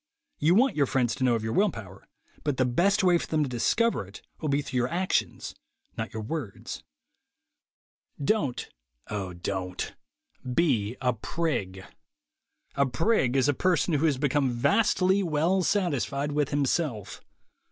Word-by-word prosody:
You 165 +4 +4
want 260 +5 +4
your 140 -2 +2
friends 125 -3 +1
to - - -3
know 125 -2 +4
of 110 - -3
your 110 0 -2
will 205 +2 +4
power, 100 - -10 0.4
but 145 -3 -1
the 130 - +3
best 190 - +2
way 175 -2 +4
for - - -5
them 155 -1 +1
to - - -1
discover 125 - +1
it 100 - -13 0.2
will 155 - -2
be 140 +1 +1
through 130 - -4
your 125 0 +2
actions, 180 +6 -1 0.4
not - - -4
your 110 0 -5
words. 115 -4 -5 1.4
Don't, 140 - 0 0.4
(O 100 -3 -3
Don't) 90 +1 -4 0.6
be 125 -9 +1
a 125 -1 +2
prig. 105 - -3 0.9
A 140 -1 +2
prig 135 - +1
is 135 - +3
a 145 - +3
person 175 +1 +1
who 155 +2 +3
has 140 -4 +1
become 140 -1 +1
vastly 185 - +2
well 170 +2 +1
satisfied 150 - 0
with 145 -1 0
himself. 135 - -1
140 Hz, 155 wpm, -27 LUFS, 120-170 Hz, 1.4 s, You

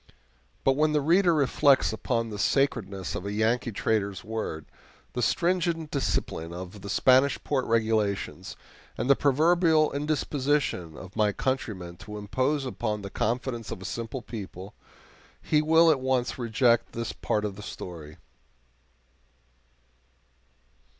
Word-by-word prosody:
But 135 - +3
when 155 +1 +2
the 150 - +3
reader 170 +5 +4
reflects 140 -4 +3
upon 115 +1 -1
the 105 - -6
sacredness 100 -8 0
of - - -4
a 100 - -4
Yankee 115 +3 +1
trader's 100 -2 -1
word, 110 -8 -4 0.5
the 125 - -2
stringent 170 - 0
discipline 85 - -2
of 90 +3 -8
the 100 - -7
Spanish 130 +6 +4
port 135 -3 0
regulations, 110 -3 0 0.4
and 115 - -2
the 140 - +6
proverbial 160 +3 +3
indisposition 145 - -1
of 95 +1 -11
my 105 -2 +2
countrymen 100 -9 -3
to 105 +3 -9
impose 130 +7 -1
upon 110 -4 -3
the 100 - -7
confidence 120 0 -2
of - - -5
a 95 - -9
simple 115 +3 -5
people, 100 -3 -8 0.7
he 150 -1 +2
will 160 +1 +5
at 145 - +1
once 130 -1 -1
reject 120 0 +2
this 115 0 -4
part 105 0 -1
of 100 -2 -4
the 105 - -9
story. 80 -7 -8
120 Hz, 135 wpm, -27 LUFS, 105-140 Hz, 0.7 s, the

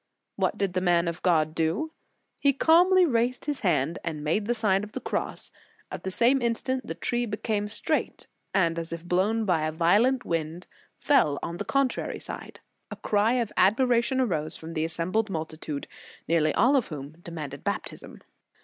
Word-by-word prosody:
What - - 0
did 195 -3 -1
the 185 - 0
man 175 -1 +2
of 170 +1 -4
God 155 -4 +2
do? 165 - -1 0.5
He 280 -1 +3
calmly 360 +6 +5
raised 245 -3 0
his 290 -2 0
hand 165 -3 0
and 155 -3 -4
made 205 +8 0
the 240 - +1
Sign 210 -3 +2
of 210 - -9
the - - -3
Cross. - - -3 0.4
At - - -6
the 190 - -2
same 240 +7 +4
instant 255 +2 -1
the - - -4
tree 240 0 -1
became 210 -1 -2
straight, 210 - -2 0.3
and 170 -4 +1
as 165 0 -5
if 170 0 -6
blown 205 +6 +1
by 165 -5 +1
a - - -2
violent 205 +11 +2
wind, 165 +1 -3 0.3
fell 155 - +3
on 170 +1 -4
the - - -4
contrary 275 -2 0
side. - - -7 0.3
A - - -6
cry 210 +3 +1
of 235 -4 -1
admiration 240 +5 +3
arose 160 -10 -1
from 160 +1 -8
the 160 -1 0
assem 165 +2 -2
bled 220 0 +1
multitude, 155 -3 -5 0.4
nearly 155 -2 +2
all 250 +6 +4
of 260 - +2
whom 145 -3 -7
demanded 165 -5 -7
baptism. - - -5
190 Hz, 180 wpm, -27 LUFS, 165-240 Hz, 0.5 s, calmly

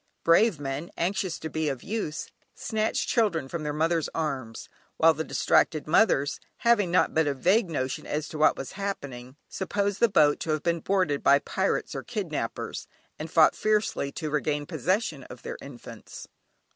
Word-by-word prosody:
Brave 170 +1 +4
men, 140 +4 -4
anxious 185 0 -1
to 160 - -6
be 160 -1 -1
of 135 -3 -5
use, 200 -8 -4 0.2
snatched 220 0 -1
children 195 - +1
from 170 +4 -5
their 150 -1 -2
mothers' 160 +2 0
arms, 135 -8 -3 0.3
while 165 0 +6
the 160 +1 -3
distracted 155 -1 +2
mothers, 155 -5 +3 0.2
having 220 -7 +3
but 160 -3 +3
a 140 - 0
vague 185 - +2
notion 130 -4 -3
as 150 0 -2
to 155 - -7
what 155 - +4
was 135 - -6
happening, 140 -11 -6
supposed 200 +1 -2
the 235 - +4
boat 150 -6 +4
to - - -5
have 155 -1 0
been 170 -1 +1
boarded 185 -5 0
by 140 - +6
pirates 140 - -1
or - - -4
kidnappers, - - -4 0.3
and 155 +2 -5
fought 160 -1 +5
fiercely 210 -9 0
to 155 -3 -4
regain 150 0 -1
possession 185 -3 -1
of - - -12
their - - -6
infants. 135 -4 -10
160 Hz, 170 wpm, -27 LUFS, 145-190 Hz, 0.3 s, while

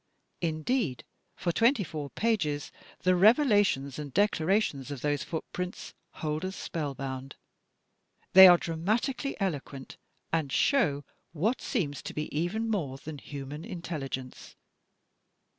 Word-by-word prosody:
Indeed, 160 - -1 0.3
for 175 - -1
twenty 230 - +3
four 150 -4 -6
pages 160 -11 -1 0.3
the 185 0 +3
revelations 205 - +4
and 145 -2 -6
declarations 190 - +1
of 140 -4 -6
those 145 -1 0
footprints 180 +2 -5 0.3
hold 155 +2 -1
us 190 +1 -3
spellbound. 135 -3 -5 1.0
They 190 0 +12
are 175 -1 +8
dramatically 215 - -2
eloquent 145 -8 -4 0.4
and 155 -4 0
show 155 - +2 0.3
what 210 - 0
seems 150 - -2
to - - -7
be 150 -1 -4
even 185 +9 -1
more 160 -12 -2
than 150 +1 -8
human 145 +2 -7
intelligence. 155 - -6
160 Hz, 115 wpm, -29 LUFS, 145-205 Hz, 1.0 s, They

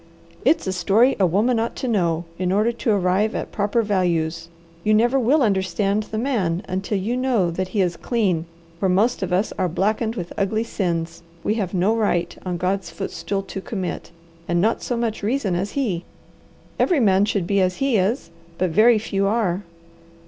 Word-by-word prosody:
It's 325 - +3
a 190 - -1
story 200 +8 +3
a 190 - +4
woman 220 +7 +2
ought 230 +1 -2
to 260 - -4
know 175 -7 +1
in 185 -1 0
order 210 +4 +2
to 235 0 -3
arrive 200 +1 +2
at - - -4
proper 210 +2 +1
values. 170 -5 0 0.4
You 215 0 +3
never 240 +5 +3
will 265 +4 +3
understand 195 0 +1
the 215 - -4
man 210 -8 0
until 190 +2 -2
you 210 +6 -1
know 250 -9 +1
that 185 +2 -2
he 200 +1 0
is 175 -2 0
clean 190 -9 0 0.3
where 190 - +1
most 210 +7 +2
of 185 -2 -2
us 185 +4 +1
are 185 -1 +1
blackened 215 +6 0
with 175 -6 -5
ugly 215 +3 +1
sins 170 -7 -3 0.2
we 210 - +1
have 190 -1 -3
no 190 +5 +2
right 175 -6 0
on 180 -2 -3
God's 185 +2 -1
footstool 195 0 -4
to 195 - -6
commit 190 -3 -4 0.4
and 175 0 +1
not 220 +6 +1
so 245 - -2
much 230 -2 -2
reason 215 -2 0
as 190 +4 -2
he. 205 -12 -1 0.8
Every 350 -5 +3
man 195 -4 +4
should 200 -4 -1
be 200 +2 +2
as 185 0 +1
he 270 -4 +2
is, 195 -2 0 0.3
but 185 -2 0
very 220 +6 +5
few 195 -2 -1
are. 200 -4 0
200 Hz, 190 wpm, -22 LUFS, 180-225 Hz, 0.8 s, very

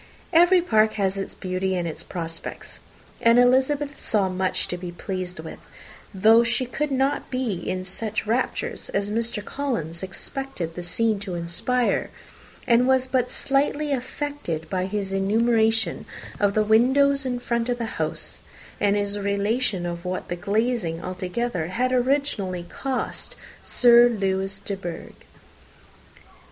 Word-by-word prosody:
Every 350 +2 +6
park 220 -8 +3
has 195 -2 0
its 195 0 -5
beauty 185 0 -2
and 175 -1 -1
its 160 - -5
prospects; 165 -2 -6 0.4
and 230 +1 +5
Elizabeth 270 +3 +3
saw 200 -3 +2
much 185 0 0
to - - -1
be 180 0 -6
pleased 180 0 -5
with, 160 0 -8 0.5
though 220 +4 +6
she 235 +2 0
could 300 +4 -2
not 270 +1 0
be 255 -4 -1
in 185 +1 -3
such 215 +4 -3
raptures 235 +4 -1
as 200 +1 0
Mr. 225 -1 -2
Collins 220 - -3
expected 190 - -5
the 175 - -6
scene 215 +4 0
to 195 -3 -5
inspire, 175 +9 0 0.6
and 245 0 +4
was 260 -1 +4
but 255 -1 0
slightly 285 +2 0
affected 255 - -4
by 185 -1 0
his 195 -1 -3
enumeration 220 0 +2 0.3
of 200 -1 +2
the 215 - +4
windows 265 +6 +4
in 255 -2 -1
front 235 -1 -1
of 245 - 0
the 235 - -2 0.2
house, - - -3 0.4
and 205 0 +3
his 205 0 -1
relation 200 0 0
of 170 0 -4
what 185 0 -4
the 175 - -1
glazing 200 -3 -1
altogether 185 0 -2
had 250 +8 0
originally 250 -8 0
cost 260 +8 -4 0.3
Sir 240 0 +6
Lewis 195 -3 -1
de 200 - -4
Bourgh. 175 -3 -7
215 Hz, 145 wpm, -24 LUFS, 185-250 Hz, 0.6 s, Every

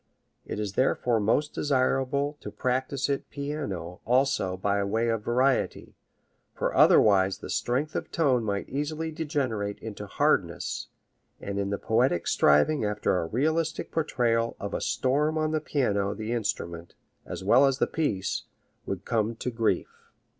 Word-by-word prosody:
It - - -4
is 105 -2 -3
therefore 125 -2 +2
most 130 +8 +1
desirable 140 +1 +1
to - - -6
practise 130 +1 -1
it 140 -1 -2
piano 140 - -5
also 125 -7 +1
by 100 +1 0
way 110 +4 0
of 115 -2 -1
variety, 130 +3 0 0.6
for - - -1
otherwise 95 -2 +5
the - - -8
strength 135 +6 -1
of - - -3
tone 135 -7 +2
might 100 -2 -2
easily 155 +3 -3
degenerate 135 - -2
into 105 -2 -7
hardness, - - 0 0.5
and 100 0 -4
in 100 0 -1
the 100 - -1
poetic 110 -7 +1
striving 75 - +3
after 105 -3 0
a 80 - -2
realistic 160 - -1
portrayal 115 -7 0
of - - -5
a - - -2
storm 150 +4 +1
on 155 0 0
the 155 -1 0
piano 100 -10 0
the 110 +2 -4
instrument, 100 -7 -3 0.3
as - - -6
well 125 +8 +6
as 135 -1 +1
the - - +2
piece, 105 -12 -2 0.4
would 95 0 -4
come 115 -1 0
to 125 - -4
grief. 115 -1 -2
120 Hz, 150 wpm, -27 LUFS, 100-140 Hz, 0.6 s, well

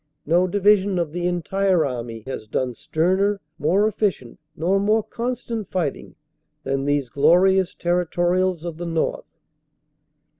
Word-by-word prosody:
No 175 +4 +3
division 200 0 +3
of 170 -4 -1
the 175 +2 -2
entire 180 0 +1
army 120 -4 -5
has 130 -5 -6
done 125 +3 -2
sterner, 190 - 0 0.2
more 185 +8 +3
efficient, 195 - -2 0.2
nor 185 +5 +1
more 215 +2 +2
constant 235 -3 -4
righting 160 -7 -2 0.5
than 135 0 -1
these 145 -2 +1
glorious 180 +8 +3
Territorials 175 0 0
of 170 -2 -5
the 175 0 -5
North." 165 -1 -3
175 Hz, 125 wpm, -22 LUFS, 155-195 Hz, 0.5 s, No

